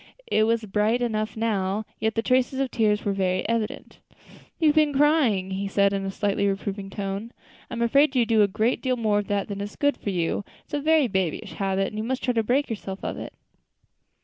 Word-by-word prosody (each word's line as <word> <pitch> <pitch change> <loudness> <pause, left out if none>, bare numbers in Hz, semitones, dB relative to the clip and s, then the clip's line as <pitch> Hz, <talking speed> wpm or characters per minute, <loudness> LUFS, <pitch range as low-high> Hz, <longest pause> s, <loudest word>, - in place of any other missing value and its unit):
It 215 - +2
was 230 -1 +1
bright 210 +4 +1
enough 220 -2 -2
now, 210 -2 -1
yet 220 0 0
the 225 - 0
traces 255 +1 +1
of 270 -2 -1
tears 210 -2 +1
were 200 - +1
very 185 -1 0
evident. 225 -1 -3 0.6
"You 315 -2 +4
have 295 - +2
been 305 -2 +3
crying," 265 -11 +3
he 195 +1 -2
said, 200 0 +2
in 195 -1 -1
a - - -2
slightly 200 +1 0
reproving 195 0 -3
tone. 200 +3 -4 0.4
"I - - -5
am 235 - 0
afraid 275 +4 +3
you 245 -2 +4
do 220 -1 +3
a 205 - +5
great 215 +5 0
deal 255 -1 0
more 215 -3 +2
of 205 - -4
that 200 -1 -1
than 200 -1 -5
is 205 +1 -6
good 285 0 +1
for - - -4
you. 180 +1 -1 0.2
It - - -42
is - - -22
a 290 - 0
very 310 -2 +4
babyish 190 -3 -2
habit, 195 +2 0
and 215 - -6
you - - -2
must 255 +3 -2
try 250 - +1
to 230 - +2
break 260 +6 +1
yourself 200 -3 -6
of - - -2
it." - - -7
215 Hz, 230 wpm, -25 LUFS, 200-245 Hz, 0.6 s, a